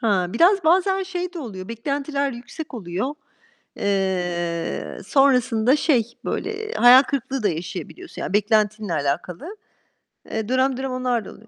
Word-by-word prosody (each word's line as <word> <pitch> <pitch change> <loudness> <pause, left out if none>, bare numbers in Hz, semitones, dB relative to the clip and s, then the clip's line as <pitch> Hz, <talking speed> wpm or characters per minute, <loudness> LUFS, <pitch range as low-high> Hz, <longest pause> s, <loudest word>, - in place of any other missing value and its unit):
Ha, 200 -6 +2
biraz 350 - +3
bazen 380 +3 +3
şey 360 -1 -4
de 350 - -7
oluyor, 195 - -7
beklentiler 280 +4 -2
yüksek 245 +6 -8
oluyor. 210 +6 -3 0.6
Eee, 180 -4 -2
sonrasında 255 -3 +3
şey 245 -7 +1
böyle, 430 +1 -3
hayal 250 +3 +8
kırıklığı 270 -2 -3
da 205 - +3
yaşayabiliyorsun. 180 - -6
Yani - - -4
beklentinle 210 -2 +1
alakalı. 175 - -3 0.7
Eee, 220 0 -3
dönem 260 0 +2
dönem 265 0 -3
onlar 250 -3 -1
da - - -9
oluyor. 220 - -16
245 Hz, 135 wpm, -22 LUFS, 200-285 Hz, 0.7 s, hayal